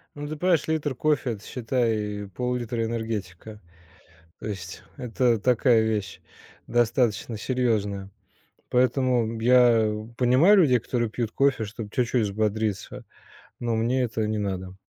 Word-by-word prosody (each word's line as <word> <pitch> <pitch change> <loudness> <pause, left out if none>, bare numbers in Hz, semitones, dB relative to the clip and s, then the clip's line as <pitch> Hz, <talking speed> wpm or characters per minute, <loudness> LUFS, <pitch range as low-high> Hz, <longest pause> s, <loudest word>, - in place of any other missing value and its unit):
Ну, 145 0 -6
ты 155 +1 -5
понимаешь, 175 -1 +1
литр 155 -3 -1
кофе- 145 -2 0
это, 105 -2 -9
считай, 110 -5 -2
пол-литра 125 -2 -2
энергетика. 110 -3 -5 0.8
То - - -9
есть 100 -3 -7
это 120 -1 +1
такая 120 0 +3
вещь, 105 -5 -2 0.5
достаточно 120 -1 +1
серьезная. 105 -5 -1 0.6
Поэтому, 125 -1 +2
м, 115 +1 -4
я 120 -2 +5 0.3
понимаю 130 +12 +5
людей, 130 -9 +5
которые 120 -1 -2
пьют 115 -2 -3
кофе, 135 -5 +2
чтоб 105 0 -7
чуть-чуть 125 -1 +1
взбодриться, 105 -1 -2 0.5
но 120 -1 -1
мне 120 +4 +1
это 110 -2 -1
не 110 - -1
надо. 95 -2 -4
115 Hz, 130 wpm, -25 LUFS, 105-125 Hz, 0.8 s, я